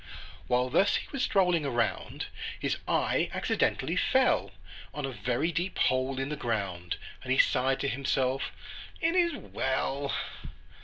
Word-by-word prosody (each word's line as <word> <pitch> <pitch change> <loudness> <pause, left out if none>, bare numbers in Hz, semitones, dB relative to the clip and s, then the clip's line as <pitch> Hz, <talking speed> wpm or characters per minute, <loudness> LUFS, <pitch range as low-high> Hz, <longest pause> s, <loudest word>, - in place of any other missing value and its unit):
While 125 +1 +2
thus 200 +8 +4
he - - -2
was 275 - -2
strolling 180 -5 +3
around, 120 -4 -1 0.3
His - - 0
eye - - +2
accidentally - - +1
fell - - +3 0.5
On 150 -1 -2
a 135 - -3
very 125 +6 0
deep 175 +4 -2
hole 130 +1 +2
in 135 +1 -2
the 150 - -2
ground, 100 - -2 0.2
And 130 - -4
he 130 - +3
sighed 135 +1 +3
to 140 - 0
himself, 135 0 0 0.5
"It 330 +1 +2
is 345 -2 +3
well!" 140 +1 -1
135 Hz, 145 wpm, -29 LUFS, 125-160 Hz, 0.5 s, thus